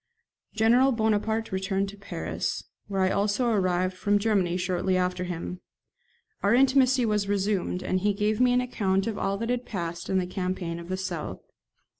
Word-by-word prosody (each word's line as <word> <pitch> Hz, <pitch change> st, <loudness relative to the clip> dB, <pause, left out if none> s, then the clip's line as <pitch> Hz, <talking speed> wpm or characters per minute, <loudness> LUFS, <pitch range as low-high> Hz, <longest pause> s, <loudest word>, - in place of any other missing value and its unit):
General 240 Hz, +5 st, +4 dB
Bonaparte 220 Hz, -1 st, 0 dB
returned 190 Hz, +1 st, -1 dB
to 205 Hz, -, -10 dB
Paris, 200 Hz, 0 st, -4 dB, 0.2 s
where 195 Hz, -1 st, -1 dB
I 185 Hz, 0 st, +3 dB
also 205 Hz, +5 st, +1 dB
arrived 185 Hz, -2 st, +1 dB
from 205 Hz, +2 st, +2 dB
Germany 200 Hz, -5 st, +1 dB
shortly 185 Hz, 0 st, 0 dB
after 180 Hz, 0 st, -1 dB
him. 175 Hz, +1 st, -5 dB, 0.8 s
Our 205 Hz, +4 st, +3 dB
intimacy 260 Hz, -1 st, +4 dB
was 210 Hz, -2 st, 0 dB
resumed, 200 Hz, -2 st, 0 dB
and 185 Hz, -, 0 dB
he 205 Hz, +1 st, +1 dB
gave 210 Hz, +2 st, 0 dB
me 250 Hz, 0 st, +5 dB
an 250 Hz, 0 st, +3 dB
account 195 Hz, -6 st, 0 dB
of 225 Hz, -2 st, -3 dB
all 195 Hz, 0 st, 0 dB
that 230 Hz, +3 st, -2 dB
had 250 Hz, 0 st, -1 dB
passed 170 Hz, -6 st, -5 dB
in 190 Hz, -, +2 dB
the 185 Hz, -, +1 dB
campaign 180 Hz, -2 st, -3 dB
of 170 Hz, +1 st, -10 dB
the 185 Hz, -, -1 dB
south. 180 Hz, -4 st, -4 dB
200 Hz, 175 wpm, -27 LUFS, 185-220 Hz, 0.8 s, me